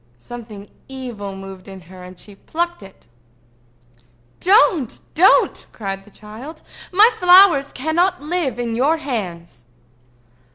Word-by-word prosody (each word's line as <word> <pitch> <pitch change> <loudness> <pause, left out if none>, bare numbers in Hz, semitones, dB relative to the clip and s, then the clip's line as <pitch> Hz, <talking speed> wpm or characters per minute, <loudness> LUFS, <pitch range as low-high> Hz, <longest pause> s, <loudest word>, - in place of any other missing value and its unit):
Something 215 - -11 0.2
evil 240 -7 -7
moved 195 0 -11
in 190 -1 -11
her, 180 +2 -14
and 180 0 -12
she 205 - -10
plucked 345 - -4
it. 195 -1 -16 1.3
"Don't! 365 - +3
don't!" 365 +5 +3
cried 195 -2 -6
the - - -17
child. 220 +10 -12 0.3
"My 420 +6 +6
flowers 360 -6 +6
cannot 345 +7 0
live 300 -5 -2
in 240 -1 -3
your 285 +7 +2
hands." 180 - -6
240 Hz, 120 wpm, -19 LUFS, 195-325 Hz, 1.3 s, My